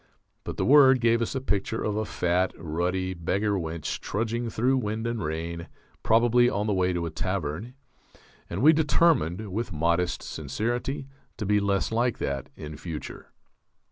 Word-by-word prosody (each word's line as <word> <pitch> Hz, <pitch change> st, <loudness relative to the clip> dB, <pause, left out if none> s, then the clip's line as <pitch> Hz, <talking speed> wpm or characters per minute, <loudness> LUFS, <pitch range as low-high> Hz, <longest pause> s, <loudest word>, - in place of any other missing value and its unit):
But -, -, -6 dB
the -, -, 0 dB
word 135 Hz, -2 st, +7 dB
gave 115 Hz, 0 st, +3 dB
us 115 Hz, -, -2 dB
a -, -, 0 dB
picture 105 Hz, -2 st, -1 dB
of 105 Hz, -, -1 dB
a 110 Hz, 0 st, -1 dB
fat, 90 Hz, -1 st, 0 dB
ruddy 90 Hz, +3 st, -2 dB
beggar 95 Hz, +5 st, -1 dB
wench 85 Hz, -5 st, -3 dB
trudging 115 Hz, +3 st, -2 dB
through 125 Hz, +4 st, +1 dB
wind 110 Hz, 0 st, -3 dB
and 115 Hz, -3 st, -2 dB
rain, 85 Hz, +2 st, -4 dB, 0.3 s
probably 120 Hz, +2 st, +4 dB
on 105 Hz, -2 st, -1 dB
the 105 Hz, -, +1 dB
way 95 Hz, -1 st, +2 dB
to 85 Hz, -1 st, -2 dB
a 85 Hz, -, -4 dB
tavern; 95 Hz, -, -3 dB, 0.7 s
and 95 Hz, +8 st, -3 dB
we 155 Hz, +2 st, +8 dB
determined, 145 Hz, -, +2 dB
with 110 Hz, +2 st, -3 dB
modest 85 Hz, +2 st, 0 dB
sincerity, 120 Hz, +5 st, -3 dB, 0.3 s
to 110 Hz, -, -3 dB
be 105 Hz, +1 st, +3 dB
less 100 Hz, 0 st, 0 dB
like 120 Hz, 0 st, +1 dB
that 70 Hz, -2 st, -3 dB
in 75 Hz, 0 st, -8 dB
future. 80 Hz, -4 st, -7 dB
105 Hz, 165 wpm, -27 LUFS, 85-115 Hz, 0.7 s, we